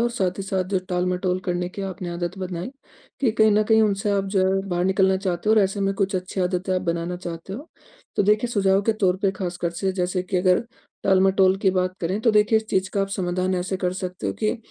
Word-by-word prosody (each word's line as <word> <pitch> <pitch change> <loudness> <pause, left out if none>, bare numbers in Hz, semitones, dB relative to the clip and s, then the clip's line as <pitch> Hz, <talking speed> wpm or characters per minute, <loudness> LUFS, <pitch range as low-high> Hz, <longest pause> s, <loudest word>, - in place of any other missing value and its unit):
और 240 0 +1
साथ 190 -6 -1
ही 195 - -2
साथ 190 -1 -1
जो - - +4
टालमटोल 180 0 0
करने 180 0 -1
की 195 +2 -7
आपने 185 -2 -5
आदत 175 +2 -4
बनाई 185 +3 -4 0.5
कि 250 -5 +3
कहीं 220 0 +4
न 210 +1 +4
कहीं 220 +1 +4
उनसे 205 0 +1
आप 200 -1 +1
जो 190 0 +4
है 195 0 +1
बाहर 175 0 0
निकलना 190 0 +3
चाहते 190 +1 -2
हो 220 - +6
और 215 - +5
ऐसे 195 +1 -1
में 195 0 +1
कुछ 195 0 -1
अच्छी 185 +1 -4
आदतें 180 +1 -1
आप 185 - +1
बनाना 170 0 -2
चाहते 175 0 -7
हो। 275 +11 -8 0.5
तो - - +3
देखिए, 210 +4 +2
सुझाव 195 -2 +2
के 225 - +2
तौर 185 -1 +3
पे 195 - +3
खास 180 -2 -3
कर 170 - +1
से 190 -1 0
जैसे 180 0 -1
कि 185 0 -3
अगर 180 +3 +3 0.4
टालमटोल 190 0 +4
की 190 - +4
बात 185 0 0
करें 185 +5 -1
तो 230 - +3
देखिए, 210 +1 +4
इस 220 - -1
चीज़ 190 0 0
का 200 - -1
आप 195 - 0
समाधान 185 0 -1
ऐसे 180 +1 -2
कर 180 -1 -1
सकते 185 -1 -5
हो - - 0
कि 215 +3 +1
190 Hz, 250 wpm, -23 LUFS, 180-200 Hz, 0.5 s, हो